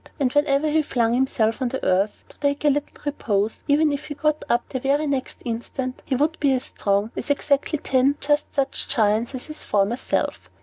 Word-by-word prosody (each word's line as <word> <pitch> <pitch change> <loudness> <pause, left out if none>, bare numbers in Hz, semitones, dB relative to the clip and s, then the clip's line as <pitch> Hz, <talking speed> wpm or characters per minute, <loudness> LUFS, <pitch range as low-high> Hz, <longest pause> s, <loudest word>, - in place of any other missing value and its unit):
And 255 -3 +1
whenever 290 0 +2
he 310 +1 +3
flung 235 -5 +1
himself 240 -2 +1
on 255 - +1
the 265 - -4
earth 195 +3 +1
to - - -18
take 285 +1 0
a - - +6
little 290 +1 -3
repose, 215 -7 -1
even 300 +1 +4
if 285 +1 -4
he 290 - -5
got 305 +1 0
up 240 0 +1
the 260 - -3
very 280 +3 +1
next 275 -3 -3
instant, 250 +2 -4
he 265 - +1
would 300 +5 0
be 280 -2 +3
as 255 0 -1
strong 200 +2 -1
as - - -5
exactly 285 +2 +1
ten 270 0 +2
just 295 +1 0
such 275 -1 0
giants 220 +3 +1
as 255 - -6
his 305 0 -3
former 205 +3 +1
self. - - -2
270 Hz, 210 wpm, -23 LUFS, 235-290 Hz, -, a